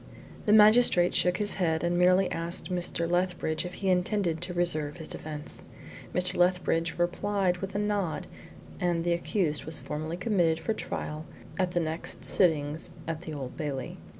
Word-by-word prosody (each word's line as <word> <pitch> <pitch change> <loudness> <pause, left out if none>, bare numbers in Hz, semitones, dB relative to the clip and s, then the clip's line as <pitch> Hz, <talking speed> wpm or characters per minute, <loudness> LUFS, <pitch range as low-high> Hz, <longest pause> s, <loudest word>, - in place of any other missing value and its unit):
The - - +4
magistrate 215 -4 +6
shook 180 0 +3
his 205 -1 -1
head, 160 -2 +1
and 175 0 +1
merely 180 +2 +4
asked 170 +2 -4
Mr. 175 -1 -1
Lethbridge 175 -2 0
if 180 - -9
he 195 - -1
intended 180 -2 0
to 175 - -3
reserve 155 -4 0
his 160 - -8
defence. 150 -1 -3 0.5
Mr. 180 +1 0
Lethbridge 175 -2 +2
replied 180 +1 0
with 195 +2 -6
a - - +1
nod, 205 -5 -1 0.5
and 175 -2 0
the 175 0 +2
accused 170 -3 -1
was 160 0 +2
formally 155 +3 -4
committed 175 -5 +1
for 220 - -1
trial 155 -6 -5 0.3
at 180 -1 +1
the 175 - +2
next 160 0 -3
sittings 155 -3 +2 0.2
at 165 -1 -3
the 160 -3 -7
Old 130 -3 -6
Bailey. 145 -5 -4
175 Hz, 165 wpm, -28 LUFS, 160-185 Hz, 0.5 s, magistrate